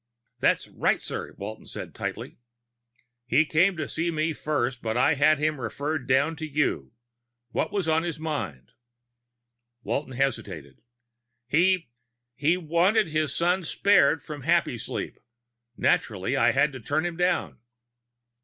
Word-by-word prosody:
"That's - - +2
right, - - 0
sir," - - -6
Walton - - -7
said - - -7
tightly. - - -6 0.9
"He 155 +4 +4
came 170 +4 +3
to 155 - -3
see 165 +2 -1
me 160 0 0
first, 130 -5 -2
but 110 0 -2
I 130 - +4
had 150 +2 +4
him 150 -1 -1
referred 140 +4 -3
down 140 +5 +2
to 160 -1 -5
you. 140 - -1 0.6
What - - -1
was 200 -5 -1
on 160 0 +3
his 165 -2 -3
mind?" 145 - -4 1.1
Walton 135 -2 -2
hesitated. 100 - -3 0.6
"He 170 +1 +2 0.4
he 150 +8 +2
wanted 180 +4 +2
his 155 -1 0
son 180 +3 +2
spared 160 -4 +3
from 150 -2 -7
Happysleep. - - -1 0.6
Naturally, - - +1
I - - +4
had 140 +2 +2
to 130 - -8
turn 145 +8 -1
him 175 -1 -3
down." 115 - 0
155 Hz, 135 wpm, -26 LUFS, 130-165 Hz, 1.1 s, He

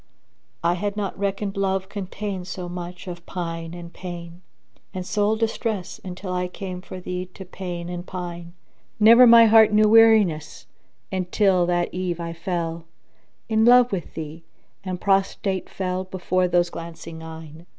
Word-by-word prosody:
I 170 +1 +3
had 205 +3 -3
not 200 -2 -2
reckoned 200 0 -2
Love 190 -1 0
contained 195 -1 -5
so 185 -1 -5
much 175 +1 -7
of 175 -1 -7
pine 165 -1 -5
and 170 -1 -10
pain; 175 -1 -8 0.3
* - - -38
And 185 -1 -4
soul 210 +2 +1
distress 220 -3 -2
until 185 0 -6
I 180 0 -1
came 180 0 -7
for 185 0 -9
thee 180 0 -4
to 190 - -9
pain 175 -2 -6
and 175 0 -5
pine 175 -2 -7 0.5
Never 230 +4 +8
my 230 0 +9
heart 220 -1 +7
knew 215 0 +5
weariness, 215 -8 +4 0.5
until 185 -1 +2
that 175 0 0
eve 180 -1 -2
I 170 0 -4
fell 165 -1 -3 0.3
* - - -42
In 220 -1 +2
love 245 +1 +6
wi' 190 -3 -1
thee, 160 +1 -7 0.4
and 185 -2 -4
prostrate 195 -1 0
fell 185 0 -3
before 185 0 0
those 175 0 +2
glancing 165 -1 -8
eyne! 160 0 -10
180 Hz, 160 wpm, -23 LUFS, 175-200 Hz, 0.5 s, my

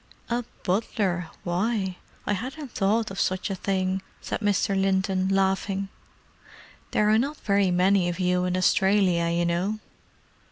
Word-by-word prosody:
"A 240 +1 0 0.2
butler—why. 185 0 -1 0.3
I 205 - +1
hadn't 260 +6 -5
thought 215 +1 +1
of 195 - -5
such 185 +1 0
a - - -1
thing," 190 0 -1 0.2
said - - -4
Mr. 205 -1 +1
Linton, 190 -1 +1
laughing. 195 0 0 1.0
"There 210 - +2
are 220 - +5
not 285 +5 -1
very 200 -2 +2
many 180 0 +3
of 175 +1 -4
you 180 0 +2
in 180 0 0
Australia, 185 -2 +3
you 170 +1 +1
know." 180 +5 0
195 Hz, 135 wpm, -26 LUFS, 180-205 Hz, 1.0 s, are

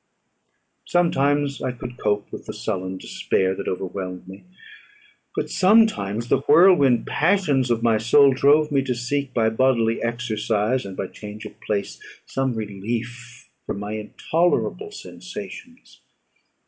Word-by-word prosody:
Sometimes 145 -4 +1
I 130 - -1
could 125 0 -8
cope 105 -1 -1
with - - -9
the - - -5
sullen 95 -3 -3
despair 95 0 -1
that - - -6
overwhelmed 90 0 -5
me: 95 - -12 0.9
but - - -1
sometimes 185 - +3
the - - +2
whirlwind 145 -10 +5
passions 150 -7 +1
of 115 -1 0
my 115 -2 +3
soul 135 +5 +5
drove 150 +3 +3
me 140 -1 +2
to 130 -2 -2
seek, 135 +3 -2
by 110 -3 +1
bodily 115 -1 +2
exercise 115 0 -1
and 95 - -9
by - - -2
change 105 +2 -9
of - - -11
place, 100 -2 -3 0.3
some 135 -2 -2
relief 120 +4 -6 0.2
from - - -3
my 105 +1 -5
intolerable 165 - -1
sensations. 250 -10 -10
120 Hz, 135 wpm, -23 LUFS, 105-140 Hz, 0.9 s, whirlwind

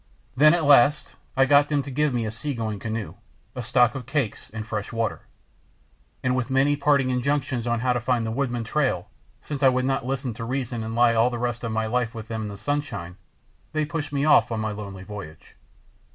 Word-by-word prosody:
Then 155 +5 +6
at 170 - -1
last 145 0 +5 0.2
I 135 - +6
got 145 +1 +5
them 145 -2 +1
to 140 - -7
give 150 +2 +1
me 120 -2 -1
a 110 - -3
sea 140 +5 -4
going 110 -3 -3
canoe, 110 -1 -4 0.4
a 125 - -4
stock 120 +1 +3
of 130 -3 -7
cakes 135 -6 -2
and 110 0 -5
fresh 105 -2 -4
water; 115 -1 -3 1.0
and 125 -1 +1
with 130 0 -1
many 135 +2 +3
parting 140 -2 +2
injunctions 130 -1 -1
how 120 +2 +1
to 125 - 0
find 120 -1 0
the 110 - -2
Woodman 120 -1 -1
trail, 125 -7 -1 0.3
since 145 -2 -5
I 135 - +7
would 130 0 0
not 135 -1 0
listen 130 -1 -2
to 115 - -7
reason 120 -1 -3
and 110 +1 -4
lie 120 0 +5
all 115 +2 +4
the 120 - -4
rest 120 0 -2
of 115 - -2
my 110 0 0
life 115 +1 -1
with 110 -1 -8
them 110 -1 -3
in 105 - -3
the 100 -1 -7
sunshine, 110 -8 -3 0.6
they 155 -1 +1
pushed 150 -2 -4
me 140 0 0
off 155 - +5
on 115 - -1
my 110 0 -2
lonely 100 -2 -7
voyage. 95 -6 -10
125 Hz, 220 wpm, -25 LUFS, 110-140 Hz, 1.0 s, I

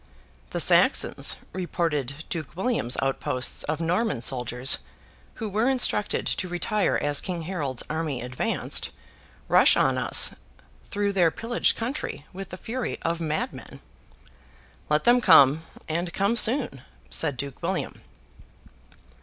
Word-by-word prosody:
'The - - -3
Saxons,' - - +4 0.2
reported 160 -6 -2
Duke 160 -2 -5
William's 190 - 0
outposts 130 -1 0
of 155 +1 -2
Norman 180 - 0
soldiers, 125 +1 +1 0.6
who 225 - -5
were 215 +5 +1
instructed 250 -5 +1
to 185 - -2
retire 200 +4 0
as 145 0 0
King 175 -3 -4
Harold's 150 -8 -3
army 155 -4 -3
advanced, 125 +1 -2 0.6
'rush - - +5
on - - +2
us - - +3 0.6
through 205 0 -1
their 175 -4 +4
pillaged 230 +8 0
country 235 - -4
with 195 0 -7
the 185 - -8
fury 240 +5 -4
of 170 0 -1
madmen.' 155 -1 -4 1.1
'Let 150 0 +2
them 245 +1 +5
come, 155 - +6 0.3
and 170 +2 -2
come 200 +6 +1
soon!' 235 - +2 0.3
said 145 -5 -1
Duke 140 +1 -6
William. - - -3
170 Hz, 125 wpm, -25 LUFS, 140-205 Hz, 1.1 s, come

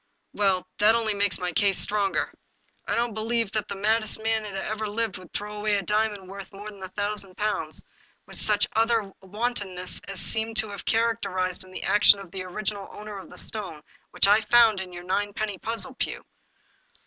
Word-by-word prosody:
" - - -48
Well, 195 -3 +1
that 215 +2 +6
only 225 -2 +1
makes 200 -3 +1
my 180 -1 -2
case 195 +2 +3
the - - +5
stronger; 205 -2 0 0.5
I - - +1
don't 235 -1 0
believe 225 0 0
that 215 -1 -1
the - - -4
maddest 215 +2 +2
man 220 0 +1
that 205 -2 -6
ever 215 0 -2
lived 210 -2 -2
would 180 -2 -14
throw 210 +1 -4
away 210 0 +1
a 200 - -2
diamond 210 0 0
worth 195 0 -9
more 205 +1 -8
than 200 -2 -14
a 190 - -4
thousand 205 -1 -1
pounds 210 0 0 0.4
with - - -5
such 210 -1 +3
utter 225 -3 +2
wantonness 195 -3 -2
as 195 -1 -3
seems 220 0 +2
to 215 - -8
have 200 - -8
characterized 200 -6 0
the - - -6
action 205 0 +6
of 195 -3 -10
the 190 0 -5
original 200 +2 -3
owner 210 -1 -7
of - - -11
the - - -10
stone 185 -9 -3 0.3
which - - +3
I 210 +2 +6
found 225 -2 +5
in 185 -1 -6
your 175 0 -8
ninepenny 205 +1 -2
puzzle, 230 +4 -3
Pugh." - - -3
205 Hz, 195 wpm, -26 LUFS, 195-220 Hz, 0.5 s, that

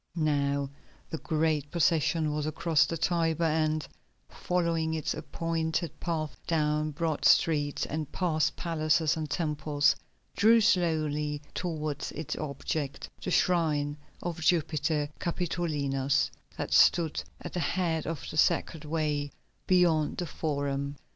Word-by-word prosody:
Now 140 -3 0 0.4
the 160 - -3
great 155 -2 0
procession 160 -1 +2
was 150 0 -2
across 155 0 +2
the 165 - -3
Tiber, 165 0 +1
and, 155 -1 +1 0.4
following 165 -3 0
its 155 - -1
appointed 160 +1 -2
path 160 -3 -2
down 150 -1 +1
broad 155 0 -2
streets 145 -3 +3
and 155 -1 -4
past 155 -5 +1
palaces 155 -2 +1
and 155 -2 -4
temples, 150 -2 +1 0.4
drew 225 +3 +6
slowly 155 -8 +1
towards 155 -4 -3
its 155 - -4
object, 145 0 -4
the - - -3
shrine 155 -5 +2 0.3
of 175 -2 -4
Jupiter 155 -2 +1
Capitolinus, 145 -6 0 0.3
that - - -3
stood 165 -3 +4 0.2
at - - -8
the 180 - -1
head 165 -3 0
of 165 -2 -4
the - - -6
Sacred 160 -1 +2
Way 150 -2 -1 0.4
beyond 170 -5 +3
the 175 - -2
Forum. 140 -2 -2
155 Hz, 120 wpm, -29 LUFS, 150-165 Hz, 0.4 s, drew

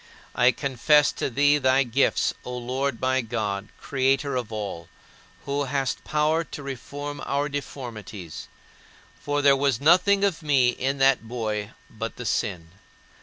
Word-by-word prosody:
I 125 0 +4
confess 140 +3 +3
to - - -3
thee 145 +3 +3
thy 130 0 +3
gifts, 130 +2 +1
O 125 0 -5
Lord 125 +1 -2
my 130 0 +1
God, 105 -3 -3
creator 135 0 0
of 120 -3 -3
all, 100 -6 -5 0.6
who 140 +1 -1
hast 135 -1 -2
power 155 +2 +1
to 150 -2 -9
reform 145 +2 -6
our 140 +1 0
deformities 115 - -7 0.7
for 145 0 -1
there 140 -1 +6
was 135 -3 +1
nothing 185 +6 +4
of 185 -4 +1
me 140 -5 +3
in 135 +3 -1
that 135 -4 +3
boy 110 -3 -3
but - - -6
the - - -7
sin. 85 -4 -2
135 Hz, 145 wpm, -25 LUFS, 120-145 Hz, 0.7 s, there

